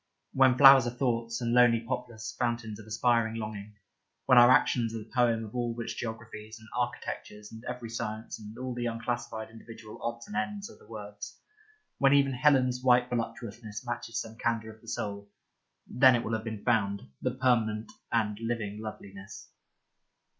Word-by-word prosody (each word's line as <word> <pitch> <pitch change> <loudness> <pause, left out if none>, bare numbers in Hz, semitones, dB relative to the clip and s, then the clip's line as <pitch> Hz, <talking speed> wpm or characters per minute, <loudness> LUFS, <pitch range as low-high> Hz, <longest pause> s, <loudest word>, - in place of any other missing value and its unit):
When 130 -1 +5
flowers 135 -2 +9
are 120 +1 -5
thoughts, 115 -3 -1
and 120 0 0
lonely 120 -2 +6
poplars 115 -2 -5
fountains 115 -3 -2
of 110 - -12
aspiring 115 0 +1
longing; 105 -2 -6 0.5
when 125 - +7
our 120 0 +8
actions 115 -3 +3
are - - -2
the 110 - -10
poem 115 -3 +2
of 105 - -11
which 120 -1 -3
all - - -8
geographies 110 -1 -7
and 110 - -15
architectures 120 -3 -4
and 110 +1 -11
every 125 -2 -5
science 110 0 -5
and 105 +1 -10
all 130 0 -4
the 120 0 -2
unclassed 120 +1 -3 0.2
individual 110 -1 -12
odds 115 0 -4
and 105 - -9
ends 205 - -3
are - - -16
the - - -19
words, 105 -2 -8 0.6
when 135 0 +5
even 140 -1 +3
Helen's 130 -2 +3
white 125 -1 +4
voluptuousness 115 -1 -5
matches 120 -1 -3
some 115 0 -7
candour 115 -1 -1
of 110 - -21
the 115 - -19
soul 100 -2 -4 0.3
— - - -51
then 130 0 +5
it 120 - -1
will 115 - -3
have 110 0 -1
been 110 -2 -5
found, 100 -4 +1 0.2
the 125 0 -1
permanent 115 -4 +1 0.2
and 105 -2 0
living 115 -3 -3
loveliness. 100 -2 -9
115 Hz, 175 wpm, -29 LUFS, 110-125 Hz, 0.6 s, flowers